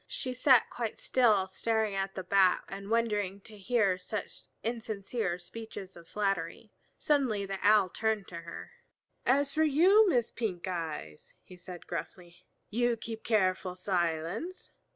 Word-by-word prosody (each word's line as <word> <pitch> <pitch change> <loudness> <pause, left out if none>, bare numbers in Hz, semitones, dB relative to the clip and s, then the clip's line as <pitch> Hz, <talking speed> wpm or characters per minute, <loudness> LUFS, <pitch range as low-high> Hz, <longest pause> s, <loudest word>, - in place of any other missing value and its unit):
She 255 -2 -3
sat 250 -1 +5
quite 230 -3 -3
still 220 -7 +3
staring 220 +2 0
at 195 0 -2
the 190 - -4
Bat 185 -1 +4
and 195 +1 -7
wondering 210 -4 0
to 215 - -14
hear 200 -2 +1
such 205 +3 -6 0.2
insincere 220 -4 -2
speeches 190 +1 -9
of 170 -1 -14
flattery. 195 0 -2 0.3
Suddenly 255 -9 +1
the 195 0 -4
Owl 210 -2 +5
turned 220 0 -1
to 170 - -7
her. 170 0 -9 0.6
"As 280 +2 +3
for 315 - +3
you, 370 +8 +6
Miss 245 -7 +1
Pink 195 -6 -3
eyes," 160 - -5
he 180 - -13
said 180 0 -10
gruffly, 175 +1 -7 0.2
"you 240 +1 +1
keep 225 0 -7
careful 185 -4 +1
silence. 180 - -2
205 Hz, 145 wpm, -30 LUFS, 185-230 Hz, 0.6 s, you